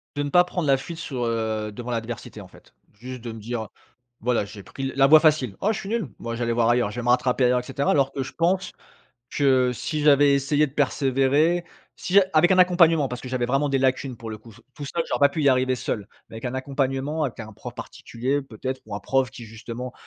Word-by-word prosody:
De 145 - -1
ne 145 - -3
pas 180 +5 +6
prendre 180 -3 -3
la 135 -1 +4
fuite 165 +5 -8
sur, 130 -7 -4
heu, 110 -2 -2
devant 120 +4 -8
l'adversité 115 0 -5
en - - -10
fait, - - -20 0.2
juste 125 +4 -9
de 115 0 -6
me 110 - -9
dire: 110 0 -4 0.5
«Voilà, 120 -2 +1
j'ai 100 0 -11
pris 135 +8 -9
l 135 - -2
la 135 0 +5
voie 155 +2 +8
facile. 150 - +2
Oh 210 - +1
je - - -4
suis 195 - -7
nul, 225 -6 -1
bon 115 - -5
je 115 - -4
vais 120 - -2
aller 115 - 0
voir 115 0 +2
ailleurs, 120 -3 +2
je 120 - -6
vais - - -4
me 120 - -1
rattraper 125 +1 +2
ailleurs» 125 0 +3
et - - -15
cetera. 135 +2 -2
Alors 140 -2 +2
que 135 - -4
je 130 - -5
pense 185 +2 0 0.6
que 130 -3 +3
si 150 +5 -3
j'avais 145 -1 +5
essayé 145 +2 +2
de 135 - -13
persévérer, 140 +4 +2 0.3
si 195 +2 +4
avec 160 +4 +5
un 185 - +3
accompagnement, 170 -4 +5
parce 125 0 -6
que 125 - -7
j'avais 125 -1 -1
vraiment 135 +3 +1
des 135 - +2
lacunes 130 -1 0
pour 115 - -8
le 110 - -5
coup, 110 +2 -16
t - - -18
tout 145 - -7
seul 165 +5 -2
j'aurais - - -1
pas 140 - +7
pu 155 +2 -3
y 140 - +4
arriver 130 0 +2
seul 105 -4 -4 0.2
mais - - -13
avec 115 - -9
un 125 0 -3
accompagnement, 135 +3 -2
avec 130 - -4
un 110 0 -8
prof - - -9
particulier 130 +5 -4
peut-être 130 +1 -6
ou 110 - -7
un - - -7
prof 130 +5 0
qui 120 - -10
justement, 115 +3 -7
130 Hz, 255 wpm, -24 LUFS, 120-145 Hz, 0.6 s, voie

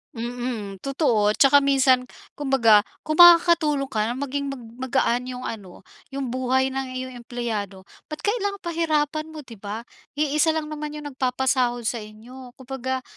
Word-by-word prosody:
Mm, 235 -4 -5
totoo 230 - +1
'tsaka 285 +1 +6
minsan 265 -2 +3 0.2
kumbaga 265 -7 +4 0.2
kung 310 +2 -3
makakatulong 335 -5 +6
ka 215 0 0
maging 280 +1 -3
mag 275 -3 -6 0.2
magaan 245 0 +1
'yung 255 0 -6
ano, 195 -6 -8 0.3
'yung 270 -3 -3
buhay 260 +1 +1
ng 265 0 -3
iyong 255 0 -5
empleyado, 220 -6 -5 0.2
ba't 305 - -8
kailangang 405 -2 -1
pahirapan 310 -3 0
mo 315 -2 -9
'di 230 -5 -13
ba. 210 +3 -6 0.3
Iisa 305 +2 +1
lang 305 -1 -3
naman 300 0 -5
'yung 295 -1 -7
nagpapasahod 255 -2 0
sa 230 +1 -2
inyo, 240 +4 -12
kumbaga 260 0 -4
260 Hz, 145 wpm, -23 LUFS, 240-295 Hz, 0.3 s, tsaka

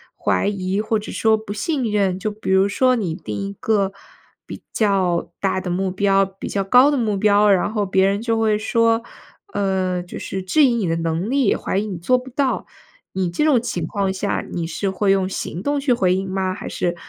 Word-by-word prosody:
怀 - - 0
疑 195 -1 -1
或 220 +1 0
者 210 - -8
说 220 -1 +2
不 215 -1 -9
信 250 +3 -1
任？ 195 -3 +1
就 215 +2 -2
比 210 -1 -7
如 190 +1 +4
说 255 +5 +3
你 195 -9 -2
定 105 -8 -6
一 - - -7
个 200 -3 +1 0.5
比 - - -9
较 185 -6 +1
大 190 -1 +1
的 185 - -5
目 185 +2 -1
标、 195 +1 +2
比 195 0 -8
较 200 - -1
高 250 +8 +6
的 290 - +1
目 215 -5 0
标， 205 +1 +4
然 195 +2 +2
后 210 -2 0
别 190 0 +2
人 200 +2 +1
就 230 -1 0
会 215 -1 +2
说 230 +1 +1 0.5
呃， 190 -2 0
就 175 - -9
是 190 - -4
质 295 +12 +3
疑 250 -4 +4
你 215 -6 -1
的 165 - 0
能 165 +4 -2
力， 265 -4 +2
怀 - - -2
疑 205 - 0
你 190 -4 -5
做 220 +10 +2
不 255 +1 -8
到。 275 0 -1 0.5
你 185 -2 -1
这 175 - -1
种 290 -6 +4
情 205 -8 -3
况 195 0 -1
下， 195 +1 -2
你 170 - -2
是 185 +4 -2
会 195 +1 +1
用 195 -1 +2
行 180 -2 -5
动 285 +3 0
去 275 -2 +1
回 185 -6 +2
应 190 0 -3
吗， 190 0 -1
还 185 - -7
是 175 -1 -2
200 Hz, 240 characters per minute, -21 LUFS, 185-220 Hz, 0.5 s, 高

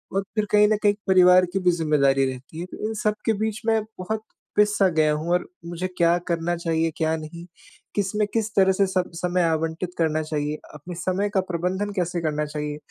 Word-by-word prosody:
और 195 - +1
फिर 215 - +1
कहीं 210 0 +6
न 215 - +2
कहीं 205 - +6
एक 205 - -18
परिवार 180 -1 +6
की 195 - +1
भी 180 -1 +3
ज़िम्मेदारी 145 -5 +2
रहती 130 +5 -10
है। 175 - -4
तो 215 - -4
इन 220 - -3
सब 210 0 +2
के 225 - +3
बीच 220 +1 -2
में 225 -1 +3 0.2
बहुत 215 +4 -3 0.3
पिस-सा 210 -1 +4
गया 155 -1 +4
हूँ 155 +3 -3
और 180 - 0 0.2
मुझे 175 +2 -3
क्या 170 0 +4
करना 170 0 0
चाहिए, 165 -1 0
क्या 160 0 +1
नहीं, 165 +2 -9 0.5
किसमें 205 +1 0
किस 220 -1 0
तरह 190 -1 +5
से 195 +1 +2
स 185 -1 +1 0.2
समय 180 0 +1
आवंटित 165 +2 -1
करना 155 -1 +1
चाहिए, 150 -1 -2 0.2
अपने 150 +4 -9
समय 185 +4 -1
का 190 - +4
प्रबंधन 185 +4 -1
कैसे 175 -2 -1
करना 150 -1 -1
चाहिए? 150 0 -4
175 Hz, 210 wpm, -24 LUFS, 160-200 Hz, 0.5 s, कहीं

